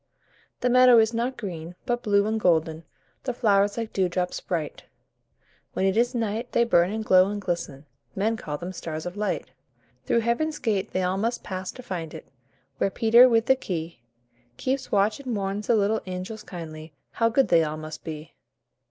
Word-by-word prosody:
The 250 - +2
meadow 255 -1 +7
is 225 +1 +4
not 240 +3 -2
green, 175 -6 -6
but 240 -1 -1
blue 205 -3 +2
and 220 +1 0
golden 160 -3 +1 0.4
The 250 -3 -2
flowers 205 -3 +2
like 230 -1 -4
dewdrops 180 -1 -1
bright; 165 -4 -4 0.9
When 190 - 0
it 195 0 +2
is 240 +2 +2
night, 230 +1 -2
they 235 - +4
burn 175 -6 +3
and 220 0 -3
glow 185 0 +5
and 205 0 -3
glisten 170 -7 -4 0.3
Men 215 +4 +1
call 150 -9 -5
them 175 +4 -6
stars 160 -3 -6
of 180 +1 -5
light. 210 -1 -2 0.6
Through 235 - +3
Heaven's 300 +7 0
gate 210 -8 -1
they 185 - -1
all 180 +1 0
must 230 +3 -1
pass 185 -1 -5
to 255 - -11
find 170 -7 -5
it, - - -10 0.5
Where - - +2
Peter 235 +4 +6
with 225 -1 +3
the 265 - +5
key 170 - -5 0.6
Keeps 265 +1 -2
watch 205 +3 +2
and 255 -4 -4
warns 200 +1 -3
the 235 - +4
little 215 +1 +1
angels 185 +4 -5
kindly 160 -5 -9 0.2
How 230 0 +1
good 265 +4 +2
they 165 -1 +5
all 155 0 -3
must 155 0 -8
be. 155 0 -7
200 Hz, 185 wpm, -25 LUFS, 175-230 Hz, 0.9 s, meadow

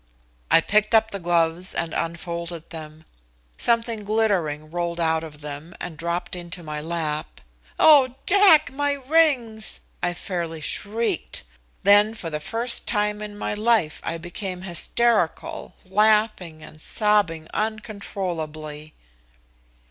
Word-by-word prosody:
I - - +6
picked 215 +5 +2
up 220 0 +4
the 200 - -4
gloves 170 +1 +1
and 165 -1 -2
unfolded 170 0 -4
them. 155 -1 -9 0.5
Something 230 -2 +1
glittering 185 -9 0
rolled 170 0 -2
out 160 -1 +1
of 150 -2 -10
them 150 +3 -8
and 170 - -6
dropped 170 +3 -3
into 175 0 -8
my 150 -1 -5
lap. 155 -2 -3 0.4
"Oh, 275 -5 +6
Jack, 350 -9 +6
my 285 +1 +1
rings!" 265 -6 +1 0.2
I 175 0 0
fairly 170 -3 -4
shrieked. 210 +3 -2 0.4
Then 205 +2 +5
for 170 -7 -6
the 150 - -2
first 230 +10 0
time 210 -1 +1
in 210 -1 -7
my - - -2
life 210 -7 +1
I 165 - -3
became 180 +2 -6
hysterical, 190 +2 0
laughing 210 -5 +2
and 155 0 -13
sobbing 205 -8 +1
uncontrollably. 170 -8 -4
180 Hz, 125 wpm, -24 LUFS, 165-220 Hz, 0.5 s, I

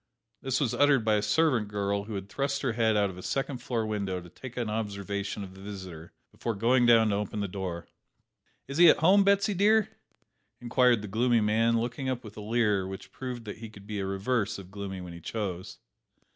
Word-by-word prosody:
This 130 -1 0
was 130 -6 0
uttered 140 -5 +3
by 110 - +3
a 105 - +2
servant 115 +1 +2
girl 100 0 -2
who 110 -1 -6
had 95 0 -5
thrust 140 +5 -2
her 125 -4 0
head 110 -1 +2
out 100 -2 +2
of 90 - -11
a - - -7
second 135 +4 -2
floor 115 -3 -2
window 100 -4 -2
to 90 0 -12
take 125 +7 -10
an 120 -2 -1
observation 100 -2 -3
of 95 -1 -9
the 95 - -13
visitor 95 -5 -8 0.2
before 115 -2 -3
going 120 +4 +3
down 115 -2 +6
to 100 - +1
open 105 +1 -3
the 100 - -1
door. 90 -3 -5 0.8
"Is 140 +4 -4
he 175 -1 +9
at - - +6
home, 190 +5 +5
Betsy 200 +1 +3
dear?" 210 +3 +3 0.7
inquired 120 -2 +3
the - - -5
gloomy 120 +4 +2
man, 115 +2 +2
looking 125 +3 -3
up 130 -1 -3
with 105 -2 -11
a 105 - -7
leer 105 -3 +1
which 95 0 -8
proved 125 -3 -6
that 105 - -7
he 115 -1 -8
could 100 -2 -14
be 105 -1 -4
the 95 - -2
reverse 100 +3 -1
of 95 -1 -11
gloomy 100 -2 -6
when 90 -1 -8
he 85 - -10
chose. 95 -3 -4
110 Hz, 220 wpm, -28 LUFS, 100-125 Hz, 0.8 s, he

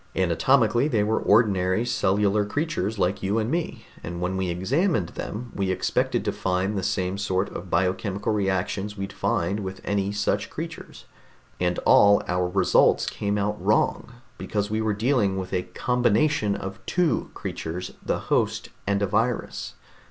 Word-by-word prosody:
Anatomically 115 - +3
they 115 -8 +1
were 110 +1 +1
ordinary 100 -1 +3
cellular 105 -3 +2
creatures 110 - -2
like 95 +1 0
you 100 +3 0
and 110 +2 0
me, 170 0 -3 0.2
and 85 +1 -5
when 90 +1 -1
we 95 -1 -1
examined 100 - 0
them 115 +6 -6
we 95 -1 -1
expected 95 - 0
to - - +1
find 95 +3 -1
the 95 - -1
same 95 +1 -1
sort 95 -1 0
of 90 - -8
biochemical 95 +3 0
reactions 100 +1 -1
we'd 100 0 -5
find 95 +5 0
with 95 -1 -5
any 100 -1 0
such 100 0 -1
creatures. - - -8 0.5
And 90 0 0
all 100 0 +6
our 90 0 0
results 95 +2 +3
came 100 0 -2
out 105 +1 -2
wrong, 120 - +1 0.3
because 105 -1 -2
we 110 0 0
were 110 -1 +1
dealing 105 -4 +1
with 95 0 -5
a 90 - +1 0.2
combination 120 -2 +2
of 95 +3 -7
two 175 -4 +1
creatures 90 +3 -5
the - - 0
host - - 0 0.2
and 100 0 +1
a - - +4
virus. 115 +4 -1
100 Hz, 160 wpm, -25 LUFS, 95-110 Hz, 0.5 s, all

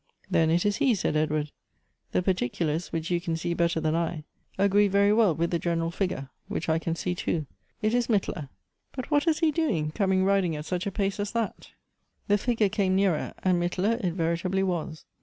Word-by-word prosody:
" - - -28
Then 160 -1 +3
it 170 +3 +2
is 205 0 +2
he," 260 -5 +3
said 180 - -1
Edward; 155 -1 0 0.6
"the 180 - +1
particulars, 165 -2 -1
which 165 - -2
4* - - -11
82 - - -3
Goethe's - - -5
you 175 -1 +1
can 165 -2 -2
see 170 +1 -2
better 170 -1 +1
than 155 0 0
I, 165 -2 -2 0.3
agree 200 +1 +4
very 200 +1 +4
well 210 -7 +4
with 170 +2 -1
the 170 - +1
gen 170 0 0
eral 165 0 -2
figure, 180 -8 -2 0.2
which 170 - -3
I 160 0 +2
can 165 0 -2
see 180 +1 -2
too. 165 -3 -2 0.4
It 215 +1 +2
is 245 -1 +2
Mittler; 185 - -1 0.4
but 255 +3 -6
what 290 +2 +2
is 315 -1 +2
he 320 -2 +4
doing, 230 - 0
coming 190 0 +1
riding 195 -4 +2
at 150 0 -6
such 180 +2 -2
a - - -1
pace 200 +1 -1
as 205 +1 -3
that? 230 -3 -3 0.3
" - - -46
The 205 0 +4
figure 230 -1 +2
came 190 -1 +1
nearer, 190 -5 +1
and 180 -2 +2
Mittler 190 +6 0
it 175 -2 0
veritably 180 +3 0
was. 170 -4 -3
180 Hz, 230 wpm, -27 LUFS, 165-200 Hz, 0.6 s, agree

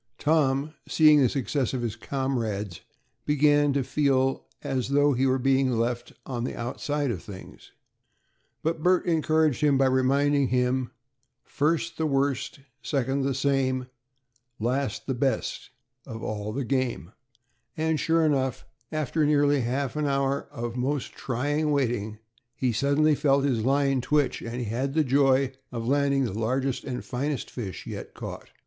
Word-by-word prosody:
Tom, 150 -1 +1
seeing 150 -2 +6
the 130 - +4
success 135 0 -1
of 125 - -2
his 115 -2 -2
comrades, 110 - -3 0.4
began 145 0 +3
to 140 -1 +1
feel 135 -2 +1 0.2
as 130 -1 -2
though 145 +1 +4
he 130 +2 +2
were 130 0 +2
being 135 0 +2
left 120 +1 -1
on 120 -3 -3
the - - -3
outside 140 +3 -2
of - - -4
things, 95 -2 -12 0.9
but 160 0 -1
Bert 180 +2 +3
encouraged 155 -4 +2
him 145 -2 +4
by 135 - +4
reminding 135 +2 +2
him, 125 0 +1 0.5
"First 165 +3 -1
the 160 - +1
worst, 135 -2 -1 0.2
second 135 -1 -1
the 135 -1 0
same, 130 -2 0 0.7
last 130 +5 -1
the 135 - -1
best 130 +1 -1 0.4
of 115 -3 -7
all 105 0 -3
the 135 +3 -3
game," 125 -7 -1 0.7
and 160 -1 0
sure 165 +1 +2
enough, 135 -4 0 0.3
after 155 0 0
nearly 145 -1 +3
half 130 +4 -2
an 150 -1 0
hour 140 0 0
of 120 -4 -5
most 135 +2 -2
trying 145 +5 -1
waiting, 120 -7 0 0.4
he 130 -2 0
suddenly 140 +6 +3
felt 140 -1 +2
his 120 -6 0
line 135 0 +2
twitch, 145 0 +1
and 120 +1 -4
had 130 +6 -2
the 160 - +4
joy 135 -1 +3 0.2
of 115 -2 -4
landing 140 0 +2
the 115 - -2
largest 130 +5 -1
and 125 -2 -5
finest 140 +3 -3
fish 100 -8 -6
yet - - -7
caught. - - -8
135 Hz, 150 wpm, -26 LUFS, 125-145 Hz, 0.9 s, seeing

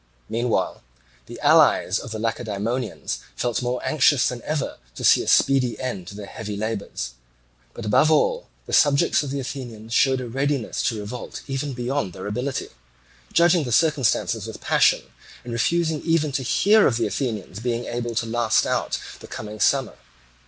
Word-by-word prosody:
Meanwhile 115 -5 -1 0.5
the - - -9
allies - - +4
of - - -8
the 110 - -4
Lacedaemonians 110 - -3 0.2
felt 120 -5 -1
all 125 0 -1
more 125 - -5
anxious 145 -3 +4
than 120 -1 -4
ever 155 -2 -3 0.2
to - - -7
see - - +6
a - - -6
speedy 130 -3 +3
end 110 -9 -4
to 100 - -9
their 105 0 -7
heavy 105 0 -6
labours. 100 - -4 0.6
But 115 - -7
above 130 +8 +4
all, 485 - +2 0.2
the - - -8
subjects 140 -2 +4
of 145 - -5
the 140 +1 -3
Athenians 120 -4 -7
showed 130 +1 +3
a 125 - -5
readiness 135 0 -1
to 110 - -4
revolt 105 +4 -7
even 135 +1 -3
beyond 125 -5 -2
their 95 - -8
ability, 125 +6 -3 0.6
judging 170 -1 +4
the 125 - -4
circumstances 150 -3 +2
with - - -8
passion, - - +3 0.4
and 120 - -6
refusing 160 +5 +1
even 165 -3 +1
to 135 - -1
hear 205 - +4
of 115 - +1
the 115 - +1
Athenians 105 -4 -3
being 120 +1 -2
able 120 -1 -4
to 115 - 0
last 115 -1 +2
out - - -1 0.2
the - - -11
coming 105 -1 -7
summer. 135 -1 +2
120 Hz, 175 wpm, -23 LUFS, 110-140 Hz, 0.6 s, see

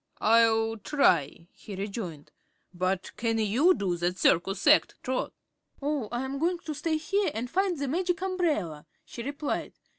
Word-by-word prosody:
"I'll 225 0 +3
try," 175 - +1
he 205 - -9
rejoined. 195 -6 -6 0.4
"But, 185 +1 -2
can 230 -1 0
you 240 - +3
do 180 -3 -1
that 175 +2 -1
circus 190 +3 +2
act, 300 +1 +5
Trot?" 260 0 -2 0.5
"Oh, 280 -6 -2
I'm 265 +3 -3
goin' 345 +3 +1
to 325 -2 -6
stay 315 +2 -1
here 380 +5 0
an' 225 +2 -2
find 365 +6 0
the 280 0 -2
Magic 350 +4 0
Umbrella," 315 - -1 0.2
she 235 - -8
replied. 285 +4 -3
240 Hz, 150 wpm, -28 LUFS, 195-310 Hz, 0.5 s, act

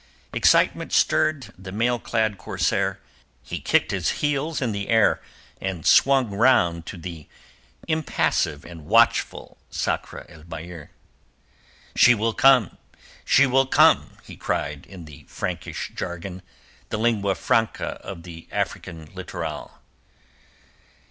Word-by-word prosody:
Excitement - - +3
stirred 130 -8 +1
the 95 0 -9
mail 120 +4 0
clad 110 -4 -1
corsair; - - -1 0.4
he - - -5
kicked - - +1
his - - 0 0.2
heels 145 +2 -1
in 125 -4 -1
the 100 -1 -4
air, 115 -2 +3 0.4
then 95 -4 -4
swung 135 -5 +4
round 85 -7 +2
to 100 - -7
the 85 -2 -8 0.6
impassive 155 - 0
and 80 -3 -11
watchful 115 +2 +2
Sakr - - -3
el 80 -3 -15
Bahr. 85 -1 -9 1.1
"She 125 - +6
will 115 +1 -1
come! 130 -6 +4 0.4
She 140 - +5
will 135 0 +2
come!" - - +4
he - - -11
cried 70 -1 -3
in 90 -4 -11
the 75 -2 -14
Frankish - - -5
jargon—the 90 - -8
lingua 105 -4 +1
franca 115 -1 -1
of 90 -4 -8
the 85 -2 -11
African 80 -2 -4
littoral. - - -7
100 Hz, 120 wpm, -23 LUFS, 85-120 Hz, 1.1 s, She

